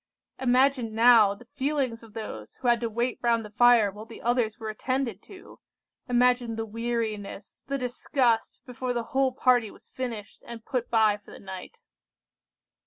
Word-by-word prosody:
"Imagine 255 -2 +2
now 225 -3 +6
the 245 - -16
feelings 270 -3 -2
of 225 -2 -16
those 110 - -7
who 250 - -5
had 240 -1 +4
to 230 - -1
wait 235 +3 -2
round 230 -2 +1
the 210 - -11
fire 235 -2 +5
while 210 +3 -11
the 230 - -11
others 240 -2 +1
were 220 -1 -5
attended 245 -2 -2
to! 375 - -14 0.5
Imagine 245 -1 +2
the 225 0 -3
weariness, 220 -2 -4
the 275 - -1
disgust, 245 -2 0
before 250 -1 -4
the 240 -1 -2
whole 265 -1 +3
party 245 -3 +2
was - - -18
finished, 230 -6 -6
and 230 -2 -9
put 250 -3 -2
by 220 -3 +3
for 205 - -20
the - - -11
night!" 190 - -9
235 Hz, 170 wpm, -27 LUFS, 220-250 Hz, 0.5 s, now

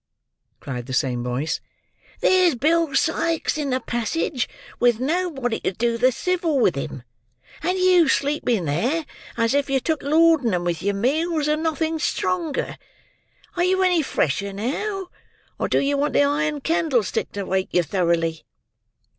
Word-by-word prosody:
cried 125 -3 -6
the 130 - -5
same 125 -2 0
voice. 125 +5 -2 0.6
"There's 365 -5 +4
Bill 310 +2 +1
Sikes 325 +2 +1
in 295 -2 -2
the 255 0 +1
passage 240 +3 -2 0.3
with 240 -2 +3
nobody 275 -5 -1
to - - -2
do 235 +4 0
the 250 +3 +3
civil 325 - +1
to 140 - -5
him; 130 - -7 0.6
and 365 +3 0
you 365 -3 +5
sleeping 265 - +1
there, 245 - 0 0.3
as 230 +1 +2
if 285 0 +1
you 270 -1 +2
took 315 +4 -1
laudanum 285 - +3
with 175 -2 -2
your 200 +1 0
meals, 305 - 0
and 305 +1 +1
nothing 320 0 -1
stronger. 325 -1 -2 0.8
Are 350 - +1
you 375 +1 +2
any 360 -3 +3
fresher 200 - -1
now, 360 - -3 0.5
or - - 0
do - - +1
you 280 0 +1
want 290 +1 0
the - - +4
iron 290 +1 0
candlestick 300 - 0
to 200 - -3
wake 190 0 -1
you 175 - +3
thoroughly?" 165 -1 0
280 Hz, 155 wpm, -23 LUFS, 200-325 Hz, 0.8 s, you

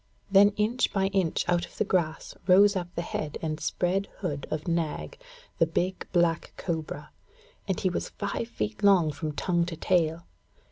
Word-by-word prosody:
Then 200 +1 +7
inch 225 +4 +1
by 195 -1 +1
inch 190 -4 0
out 175 -1 +2
of - - -19
the - - +2
grass 170 -6 -1
rose 200 +2 +6
up 180 -2 -2
the 170 - -2
head 155 -3 -4
and 155 -1 -2
spread 190 +4 0
hood 150 -7 -4
of 155 +1 -3
Nag, 170 - -2 0.4
the 165 - +4
big 180 +3 -2
black 170 -2 +1
cobra, 155 -3 -4 0.6
and 190 - -1
he 185 - +1
was - - -3
five 230 - -3
feet 105 - -4
long 185 -6 +5
from 150 +2 -4
tongue 175 +3 +1
to 170 - -4
tail. 170 -1 +1
175 Hz, 175 wpm, -28 LUFS, 160-195 Hz, 0.6 s, Then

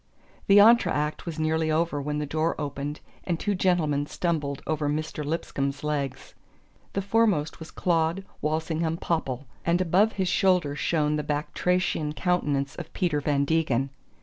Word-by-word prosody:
The 200 - +7
entr'acte 200 -9 +4
was 165 -2 -4
nearly 160 0 +1
over 155 -2 +1
when 150 +1 -2
the 150 - -1
door 155 +3 -1
opened 145 0 -4 0.2
and 170 -2 -2
two 205 - 0
gentlemen 160 -6 +1
stumbled 150 -6 -2
over 155 -2 -1
Mr. 155 0 -3
Lipscomb's 145 -2 -2
legs. 145 -3 -3 0.6
The 195 - -1
foremost 200 -7 +1
was 160 - -9
Claud 170 +2 0 0.2
Walsingham 160 +1 -1
Popple; 145 -6 -2 0.2
and 170 +1 +2
above 185 +5 +3
his 190 -2 -1
shoulder 180 -7 +2
shone 150 0 +1
the 150 - -2
batrachian 150 +1 0
countenance 145 -7 0
of 165 -2 -7
Peter 160 -5 0
Van 140 -1 +1
Degen. 140 -4 +1
155 Hz, 150 wpm, -26 LUFS, 145-175 Hz, 0.6 s, The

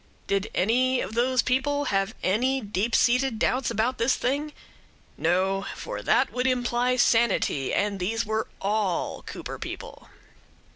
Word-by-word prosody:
Did 200 0 -1
any 250 +6 +2
of 190 - -4
those 250 +1 +2
people 285 +3 0
have 195 +2 0
any 255 +8 +1
deep 210 0 -1
seated 250 -1 +3
doubts 255 +2 +1
about 235 +5 -1
this 235 +3 +3
thing? 285 +4 -1 0.6
No; 190 +3 0
for - - -6
that - - +2
would 250 +1 0
imply 245 0 +1
sanity, 230 - +2
and 205 -1 0
these 225 +5 -1
were 220 +1 -1
all 200 -3 -1
Cooper - - -7
people. - - -8
230 Hz, 140 wpm, -26 LUFS, 200-255 Hz, 0.6 s, seated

